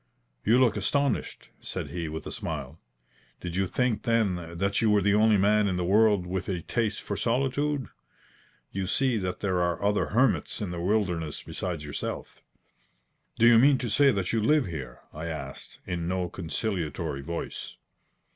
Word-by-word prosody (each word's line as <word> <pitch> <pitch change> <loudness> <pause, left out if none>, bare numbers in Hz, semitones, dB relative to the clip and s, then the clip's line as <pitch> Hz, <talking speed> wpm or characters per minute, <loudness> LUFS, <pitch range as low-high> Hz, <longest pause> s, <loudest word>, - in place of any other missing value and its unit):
"You 115 +4 +4
look 125 -3 +4
astonished," 140 +7 -1
said - - -5
he, 85 -2 -3
with 80 +1 -6
a - - -5
smile. 75 -1 -5 0.6
"Did 90 -1 -5
you 95 0 +1
think, 125 +3 0
then, 90 -8 0
that 100 +2 +1
you 110 - +3
were 105 -2 +4
the 100 +1 +3
only 110 0 +5
man 105 +1 +3
in 95 - 0
the 90 -1 -1
world 105 -1 +4
with 95 +2 -3
a 90 -3 -2
taste 110 +2 -1
for - - -3
solitude? 135 +2 0 0.8
You 95 -1 -3
see 125 +2 +1
that 90 -2 -3
there 95 -3 +1
are 85 -2 0
other 105 0 +2
hermits 125 +2 +2
in 100 -4 -3
the 85 -1 -4
wilderness 90 -6 -1
besides 85 -5 -4
yourself." 75 - -5 1.0
"Do 115 - +4
you 120 -1 +8
mean 135 +2 +6
to 120 -4 -3
say 140 +6 +5
that 100 -4 -1
you 115 - +2
live 150 +5 +3
here?" 70 -8 -7
I 80 +2 -5
asked 70 -4 -7
in 85 -1 -3
no 90 -1 -1
conciliatory 80 -6 -3
voice. 85 +4 -5
100 Hz, 175 wpm, -27 LUFS, 85-115 Hz, 1.0 s, you